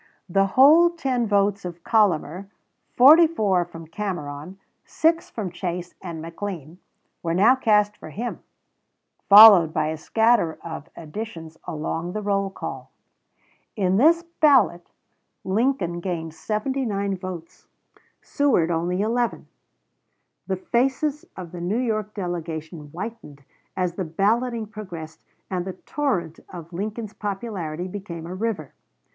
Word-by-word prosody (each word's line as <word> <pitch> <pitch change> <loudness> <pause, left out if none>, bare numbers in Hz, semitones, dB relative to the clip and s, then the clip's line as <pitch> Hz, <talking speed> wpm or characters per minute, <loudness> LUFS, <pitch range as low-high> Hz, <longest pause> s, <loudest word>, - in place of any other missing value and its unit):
The 195 +2 +2
whole 315 +6 +7
10 265 -8 -1
votes 200 -1 +1
of 175 -1 -8
Collamer, 195 -4 +1 0.5
44 255 - +6
from 165 -1 -11
Cameron, 165 -2 -5 0.3
6 330 +1 +1
from 200 -6 -5
Chase 175 0 -5
and 170 -3 -6
McLean, 165 -1 -7 0.4
were 165 0 -1
now 220 +8 +5
cast 210 -4 +2
for - - -10
him, 230 +10 -5 0.9
followed 200 -6 +10
by 155 -1 +1
a 160 - -3
scatter 220 0 +2
of 160 -2 -7
additions 165 -1 -8
along 165 +2 -4
the 215 - -3
roll 195 -1 0
call. 190 - -7 0.9
In 190 -3 +1
this 330 +7 +4 0.2
ballot 230 - +4 0.5
Lincoln 190 -4 0
gained 170 -3 -4
79 210 -1 -2
votes, 180 -3 -9 0.6
Seward 235 - +1
only 175 +3 -1
11. 235 +2 -1 1.0
The 190 -1 -1
faces 270 +8 -1
of 180 -3 -8
the 175 -1 -7
New 185 +6 -1
York 215 -4 -2
delegation 165 -4 -5
whitened 175 -5 -8 0.3
as 180 -2 0
the 185 +1 -4
balloting 225 +7 0
progressed 180 -7 -9 0.3
and 180 -2 -1
the 190 0 -5
torrent 185 - -3
of 170 -1 -10
Lincoln's 215 +3 -5
popularity 195 -5 -4
became 180 -4 -7
a 175 - -6
river. 190 -7 -3
190 Hz, 125 wpm, -23 LUFS, 170-225 Hz, 1.0 s, followed